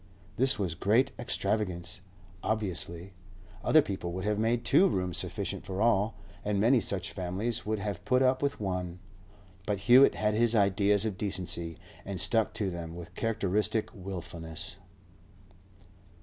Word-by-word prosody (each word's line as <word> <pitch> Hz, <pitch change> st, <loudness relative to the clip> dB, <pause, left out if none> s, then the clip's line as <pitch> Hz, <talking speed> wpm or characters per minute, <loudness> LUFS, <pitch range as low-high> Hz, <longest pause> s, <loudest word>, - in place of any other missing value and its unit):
This 130 Hz, +2 st, +3 dB
was 95 Hz, -5 st, -1 dB
great 105 Hz, +9 st, +2 dB
extravagance, 100 Hz, -6 st, -2 dB, 0.4 s
obviously; 95 Hz, -4 st, -3 dB, 0.5 s
other 155 Hz, -1 st, +5 dB
people 95 Hz, -5 st, -4 dB
would 95 Hz, +1 st, -4 dB
have 105 Hz, 0 st, 0 dB
made 115 Hz, +2 st, +1 dB
two 195 Hz, -, +5 dB
rooms 90 Hz, -, -1 dB
sufficient -, -, -4 dB
for 95 Hz, 0 st, -5 dB
all, 110 Hz, -1 st, +2 dB, 0.3 s
and 105 Hz, -1 st, 0 dB
many 120 Hz, +3 st, +4 dB
such 95 Hz, -2 st, 0 dB
families 100 Hz, +5 st, -2 dB
would 110 Hz, 0 st, 0 dB
have 100 Hz, -3 st, -4 dB
put 125 Hz, +1 st, +3 dB
up 130 Hz, 0 st, +2 dB
with 140 Hz, 0 st, -1 dB
one. 90 Hz, -3 st, -3 dB, 0.7 s
But 100 Hz, -1 st, -1 dB
Hewett 125 Hz, +6 st, +7 dB
had 105 Hz, 0 st, +1 dB
his 115 Hz, +1 st, +3 dB
ideas 100 Hz, 0 st, +3 dB
of 105 Hz, -3 st, -3 dB
decency, 85 Hz, -4 st, -2 dB, 0.3 s
and 95 Hz, -2 st, -4 dB
stuck 110 Hz, +5 st, +3 dB
to 105 Hz, -4 st, -1 dB
them 85 Hz, -1 st, -6 dB
with 85 Hz, -1 st, -9 dB
characteristic 105 Hz, -1 st, 0 dB
wilfulness. 85 Hz, -4 st, -6 dB
100 Hz, 145 wpm, -30 LUFS, 90-110 Hz, 0.7 s, Hewett